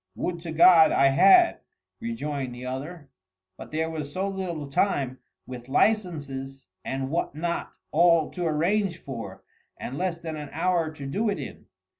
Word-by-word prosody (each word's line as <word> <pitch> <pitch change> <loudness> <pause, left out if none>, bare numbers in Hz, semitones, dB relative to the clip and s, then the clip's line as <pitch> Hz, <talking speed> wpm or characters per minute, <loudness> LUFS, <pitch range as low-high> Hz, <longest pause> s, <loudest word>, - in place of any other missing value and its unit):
"Would 175 -1 -3
to 165 -1 -7
God 165 0 +7
I 135 0 +4
had," 195 - +6 0.4
rejoined 150 - -4
the 125 +1 -8
other, 140 +3 -6 0.4
"but - - -11
there 160 +1 -1
was 155 -3 -5
so 190 +5 -2
little 180 -6 -4
time, 140 -4 0 0.3
with 125 0 -9
licences 140 -9 -1
and 135 0 -3
what 165 -3 -1
not 170 +2 -3 0.2
all 170 -1 +4
to 175 -2 -2
arrange 175 +4 +1
for, 130 -8 -8 0.3
and 135 - -6
less 180 -2 -1
than 160 -2 -5
an 150 -2 -7
hour 170 0 +1
to 145 -3 -9
do 210 +11 -1
it 200 - -1
in. - - -9
160 Hz, 160 wpm, -26 LUFS, 135-180 Hz, 0.4 s, God